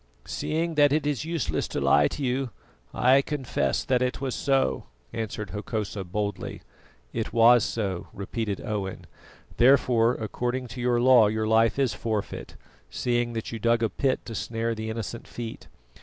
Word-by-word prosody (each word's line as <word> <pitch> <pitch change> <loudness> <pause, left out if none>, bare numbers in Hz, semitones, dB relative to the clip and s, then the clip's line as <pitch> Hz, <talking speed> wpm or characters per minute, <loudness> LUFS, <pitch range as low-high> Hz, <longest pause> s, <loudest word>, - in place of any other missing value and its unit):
"Seeing 165 +2 -2
that 145 -2 +5
it 150 +1 +1
is 145 -1 -1
useless 165 -6 -1
to - - -3
lie 75 0 +4
to 145 - -5
you, 130 0 0 0.4
I 130 +2 +4
confess 140 -3 -1
that 125 -2 +1
it 125 0 0
was 135 -2 -2
so," 135 -1 +1 0.3
answered 110 -2 -4
Hokosa 105 -2 -3
boldly. 100 +1 -4 0.5
"It 115 - -2
was 120 0 +6
so," 95 -7 -2
repeated 100 +1 -4
Owen; 105 -4 -4 0.5
"therefore, 125 -2 +4
according 125 +3 -3
to 120 +2 -6
your 120 -1 +2
law 120 -3 +6
your 110 +1 -1
life 110 +1 +3
is 135 -3 +2
forfeit, 110 -3 -4 0.3
seeing 120 -1 -1
that 115 -1 -4
you 115 - -5
dug 115 +1 +2
a 115 - +2
pit 135 -2 -1
to 115 - -7
snare 115 +1 -2
the 110 0 -5
innocent 115 +1 -5
feet. 115 -2 -7
115 Hz, 160 wpm, -26 LUFS, 110-130 Hz, 0.5 s, was